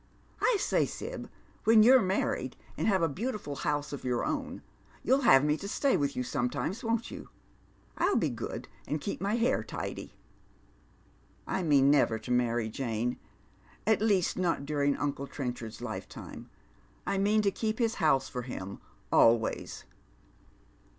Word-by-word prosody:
" - - -29
I - - +3
say. - - +2
Sib, - - -6 0.3
when 220 -1 +7
you're 255 +2 +7
married, 190 -1 -1 0.2
and - - -1
have 190 -5 +3
a - - +4
beautiful 190 - -4
house 145 -1 -2
of 140 - -6
your 125 -2 0
own, - - -3 0.4
you'll 265 +4 +3
have 140 - +6
me 150 0 +3
to 200 - -6
stay 275 +6 +1
with 140 -1 0
you 125 - -1
sometimes, 140 - -2
won't 230 0 -1
you? - - -9 0.7
I'll 405 - +3
be - - +2
good, - - -5 0.2
and 150 - -1
keep 190 +6 -4
my 200 +3 0
hair 235 +1 +1
tidy." - - -6 0.7
" - - -33
1 180 -4 -2
mean 140 -1 +6
never 135 -6 +3
to 125 - -7
marry, 120 -2 +1
Jane; 115 0 -2 0.7
at 220 -1 +3
least, 200 -5 +2
not 170 -6 0
during 145 -1 +1
unci* 140 -1 -3
Trenchard's 120 -5 -5
lifetime. - - -7 0.6
I 195 - 0
mean 210 +2 +3
to 200 - +3
keep 220 +2 -2
his 230 -2 +1
house 135 -4 +3
for 125 - -4
him, 100 -6 -7 0.3
always." 115 -1 +2
150 Hz, 160 wpm, -30 LUFS, 130-215 Hz, 0.7 s, when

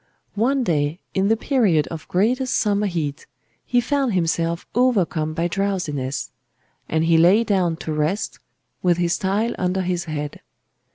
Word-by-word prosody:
"One 255 +5 +1
day, 150 -3 0
in 195 +1 +1
the 225 +2 +3
period 215 - +2
of 160 -2 -7
greatest 245 +8 +1
summer 205 -1 +1
heat, 155 -6 -3 0.4
he 245 - +2
found 270 -1 0
himself 165 -1 0
overcome 185 -11 +1
by 170 +1 0
drowsiness; 170 -8 -2 0.6
and 160 0 +1
he 165 -1 +4
lay 185 +7 +5
down 185 -6 +1
to 160 -1 -5
rest, 155 +8 -1 0.4
with 175 -2 +2
his 175 -1 0
tile 205 +5 0
under 185 +1 0
his 180 0 -2
head. 150 -2 -5
180 Hz, 150 wpm, -22 LUFS, 160-210 Hz, 0.6 s, lay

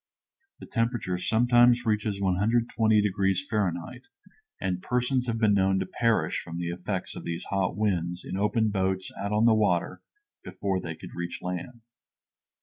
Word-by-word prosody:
The - - -11
temperature 115 -6 -1
sometimes 120 +3 +4
reaches 105 -2 0
120 110 +3 +2
degrees 95 -1 +1
Fahrenheit, 105 - -2 0.5
and 90 -1 -2
persons 125 +2 0
have 115 -1 -1
been 110 -2 +3
known 95 -1 +3
to 95 - -1
perish 115 +3 0
from 85 - -7
the 85 0 -3
effects 90 +2 -4
of - - -7
these 85 0 -4
hot 95 -1 0
winds 90 -4 -1
in - - -5
open 110 +3 +1
boats 95 -2 -1
out 100 +1 -2
on 105 +2 +3
the 115 - +6
water 100 -6 +1 0.4
before 95 -2 -2
they 80 -2 -6
could - - -11
reach 85 0 -5
land. 90 +7 -5
100 Hz, 155 wpm, -27 LUFS, 90-115 Hz, 0.5 s, the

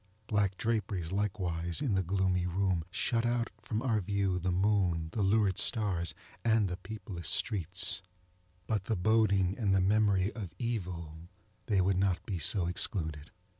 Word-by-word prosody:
Black 100 -3 0
draperies, 100 -7 -1
likewise, 90 -4 -1
in 135 -8 0
the 95 - +2
gloomy 90 0 0
room, 90 -1 0
shut 115 +5 0
out 120 0 0
from 110 +1 -3
our 115 -5 +1
view 100 -1 0
the 90 +1 -1
moon, 90 -4 +1
the 110 - -2
lurid 100 -1 +2
stars, 95 -6 +1 0.3
and 110 -3 +3
the 90 0 -4
peopleless 95 - -6
streetsŌĆöbut 90 +1 -2
the 110 - 0
boding 100 -1 +2
and 100 -4 +2
the - - +4
memory 100 +1 +2
of 95 -7 -7
Evil, 85 -8 -4 0.4
they 100 -4 +3
would 95 0 +2
not 95 -2 0
be 95 -4 -3
so 90 +4 +4
excluded. 80 -4 -1
95 Hz, 150 wpm, -31 LUFS, 90-105 Hz, 0.4 s, the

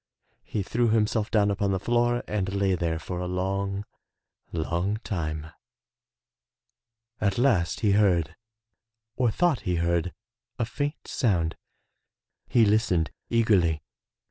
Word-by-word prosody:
He 105 - -3
threw 120 +4 +1
himself 110 -1 +1
down 105 -2 +3
upon 100 0 0
the 95 - 0
floor 120 +3 +1
and 100 -2 -2
lay 100 -1 +2
there 85 -2 0
for 90 +2 -5
a 90 - -3
long, 95 +2 -2 0.7
long 85 +6 -1
time. 80 -4 -3 1.7
At 100 -2 +1
last 120 -10 +2
he 105 - +3
heard, 90 -6 +3 0.8
or 125 -2 +2
thought 160 +2 +2
he 90 -3 -1
heard, 85 +1 0 0.5
a 115 - 0
faint 145 +6 -4
sound. 85 -9 +1 0.9
He 115 -2 +5
listened 100 -6 +2 0.2
eagerly. 95 -10 +2
100 Hz, 120 wpm, -26 LUFS, 85-110 Hz, 1.7 s, He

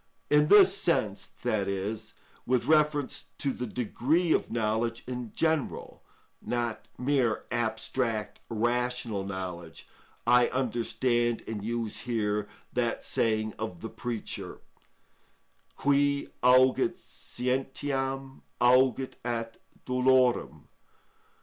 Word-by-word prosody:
In 150 0 +5
this 195 0 +7
sense, 165 - 0
that 110 -5 -2
is, 105 +3 -4 0.3
with 125 -1 +2
reference 150 -2 +2
to 140 - 0
the 125 - -4
degree 135 - 0
of - - 0
knowledge 115 +1 -1
in 125 -3 -5
general, 160 -4 -1 0.4
not 120 -2 -3
mere 125 -3 +1
abstract 115 -1 -1
rational 120 -2 -1
knowledge, 90 -4 -6 0.4
I 120 0 +5
understand 120 -1 0
and 110 -2 -4
use 115 -1 -3
here 105 -3 -1 0.2
that 120 -2 -1
saying 110 -1 0
of 100 -6 -5
the 115 - -5
Preacher: 120 -2 -5 1.2
_Qui 140 0 +2
auget 130 +1 +4
scientiam, 135 +1 -3 0.2
auget 130 +1 +4
at 115 -1 -3 0.3
dolorem. 125 -1 +2
120 Hz, 100 wpm, -29 LUFS, 110-130 Hz, 1.2 s, this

